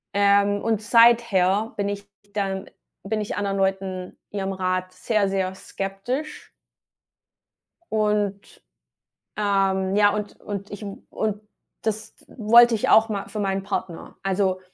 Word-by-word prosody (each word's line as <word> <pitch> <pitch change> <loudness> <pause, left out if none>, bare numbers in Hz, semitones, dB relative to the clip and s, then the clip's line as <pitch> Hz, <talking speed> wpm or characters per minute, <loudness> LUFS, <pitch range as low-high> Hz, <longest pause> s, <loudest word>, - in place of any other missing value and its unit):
Ähm, 200 0 +3
und 220 -2 0
seither 225 -3 +4
bin 200 -2 -1
ich 205 0 -5 0.3
dann 195 -2 -2 0.3
bin 215 +2 -2
ich 210 - -4
anderen 200 -1 -1
Leuten 190 -1 -2
ihrem 195 -1 -2
Rat 185 0 -2
sehr, 200 +1 0
sehr 190 -1 -1
skeptisch. 195 +12 -5 1.4
Und, 210 -2 -1 0.7
ähm, 195 -2 +1
ja, 205 0 +6
und 210 -1 -5
und 200 -1 -6
ich 205 - -8
w 200 -1 -6
und 210 -1 -2 0.4
das 220 0 -3
wollte 235 +1 +6
ich 210 - 0
auch 220 +1 +6
mal 200 -2 -4
für 215 - -6
meinen 195 -1 -1
Partner, 185 -4 -5
also 190 -1 0
200 Hz, 130 wpm, -24 LUFS, 195-215 Hz, 1.4 s, ja